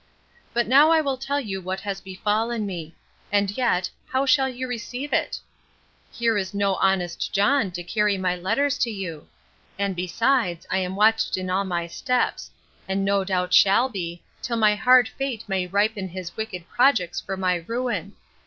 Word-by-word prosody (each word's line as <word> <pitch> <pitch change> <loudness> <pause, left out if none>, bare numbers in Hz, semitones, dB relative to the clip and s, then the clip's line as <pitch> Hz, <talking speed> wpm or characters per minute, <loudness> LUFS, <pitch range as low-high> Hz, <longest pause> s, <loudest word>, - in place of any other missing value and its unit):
But 240 0 0
now 280 +6 +6
I 325 -1 +5
will 280 -3 0
tell 275 +2 -2
you 195 -7 -4
what 185 +1 -4
has 200 -1 -4
befallen 215 +4 -1
me; 170 -5 -6 0.4
and 200 -1 +2
yet, 190 -8 +1 0.2
how 265 +1 0
shall 265 0 +3
you 255 0 -5
receive 250 +3 -5
it? - - 0 0.7
Here 230 -3 +1
is 190 0 -5
no 200 -1 +2
honest 185 -3 0
John 205 +2 +2
to 175 0 -5
carry 210 +2 +1
my 185 -1 0
letters 230 +11 0
to 240 - +1
you! 185 -8 -6 0.5
And, 200 -1 -1
besides, 185 +1 0
I 190 - +2
am 185 0 -3
watched 220 +1 +3
in 185 0 -3
all 195 +2 +1
my 175 -2 -2
steps; 250 +9 -1 0.4
and 195 +1 -1
no 200 0 +2
doubt 180 -2 -1
shall 205 +8 +5
be, 170 -6 -5 0.2
till 235 -2 -2
my 215 -2 +4
hard 250 +2 +5
fate 270 -5 -4
may 190 -2 -1
ripen 205 +1 0
his 175 -1 -7
wicked 205 -6 -5
projects 235 -10 +2
for 195 - -5
my 180 -2 0
ruin. 230 -6 -3
200 Hz, 175 wpm, -24 LUFS, 185-240 Hz, 0.7 s, now